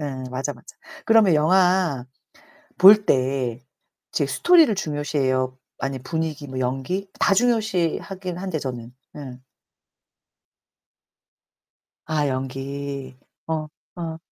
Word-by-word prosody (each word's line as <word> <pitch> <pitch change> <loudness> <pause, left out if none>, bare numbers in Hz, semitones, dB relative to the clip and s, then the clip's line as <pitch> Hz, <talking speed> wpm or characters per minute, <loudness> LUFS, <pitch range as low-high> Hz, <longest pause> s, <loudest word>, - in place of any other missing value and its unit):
음 135 -3 -5
맞아, 135 +3 -2
맞아. 120 - -16 0.3
그러면 220 -6 +5
영화 180 -3 +3 0.7
볼 205 +2 +8
때 130 -2 0 0.5
이제 - - +1
스토리를 335 -9 +4
중요시해요. 135 -6 -1 0.2
아니 135 -1 -3
분위기 155 +2 -4
뭐 130 -1 -5
연기 135 +10 -2
다 200 - +4
중요시하긴 195 -5 0
한데 185 -3 -3
저는 125 -3 -6 0.2
음. 130 -4 -9 2.7
아 150 -2 0
연기. 135 0 -5 0.3
어. 160 - -1 0.4
어. 165 -2 -5
145 Hz, 195 characters per minute, -23 LUFS, 130-185 Hz, 2.7 s, 볼